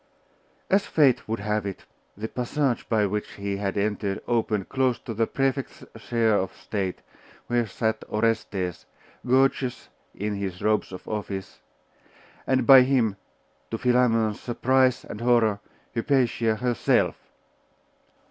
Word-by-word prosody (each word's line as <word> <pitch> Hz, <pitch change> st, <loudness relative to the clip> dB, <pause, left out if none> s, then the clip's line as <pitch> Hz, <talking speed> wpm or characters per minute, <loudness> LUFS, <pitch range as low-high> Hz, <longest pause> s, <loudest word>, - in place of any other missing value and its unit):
As 195 Hz, +1 st, +2 dB
fate 140 Hz, -4 st, +3 dB
would 110 Hz, -1 st, -3 dB
have 105 Hz, 0 st, -1 dB
it, 100 Hz, -2 st, -6 dB, 0.3 s
the 110 Hz, +2 st, -4 dB
passage 125 Hz, +1 st, -1 dB
by 110 Hz, -2 st, +3 dB
which 105 Hz, +1 st, -3 dB
he 100 Hz, -1 st, -3 dB
had 100 Hz, 0 st, -2 dB
entered 100 Hz, -1 st, -1 dB
opened 110 Hz, -4 st, 0 dB
close 130 Hz, -3 st, +1 dB
to 115 Hz, -, -7 dB
the 115 Hz, +1 st, 0 dB
Prefect's 135 Hz, 0 st, -2 dB
chair 115 Hz, -1 st, +1 dB
of 95 Hz, -1 st, -2 dB
state, 95 Hz, -4 st, -4 dB, 0.4 s
where 120 Hz, -1 st, 0 dB
sat 110 Hz, +1 st, -2 dB
Orestes, 105 Hz, -5 st, -1 dB, 0.4 s
gorgeous 130 Hz, 0 st, +1 dB, 0.3 s
in 105 Hz, +1 st, -3 dB
his 95 Hz, -2 st, -5 dB
robes 105 Hz, -2 st, +1 dB
of 90 Hz, -, -9 dB
office, 100 Hz, -3 st, -5 dB, 0.9 s
and 130 Hz, -1 st, +2 dB
by 135 Hz, -2 st, +10 dB
him 125 Hz, -6 st, +2 dB, 0.5 s
to 115 Hz, -, -3 dB
Philammon's 115 Hz, -3 st, +2 dB
surprise 130 Hz, +1 st, +2 dB
and 105 Hz, -, -8 dB
horror 115 Hz, -4 st, +3 dB, 0.3 s
Hypatia 115 Hz, -3 st, +1 dB
herself. 120 Hz, 0 st, +1 dB
115 Hz, 130 wpm, -25 LUFS, 105-125 Hz, 0.9 s, by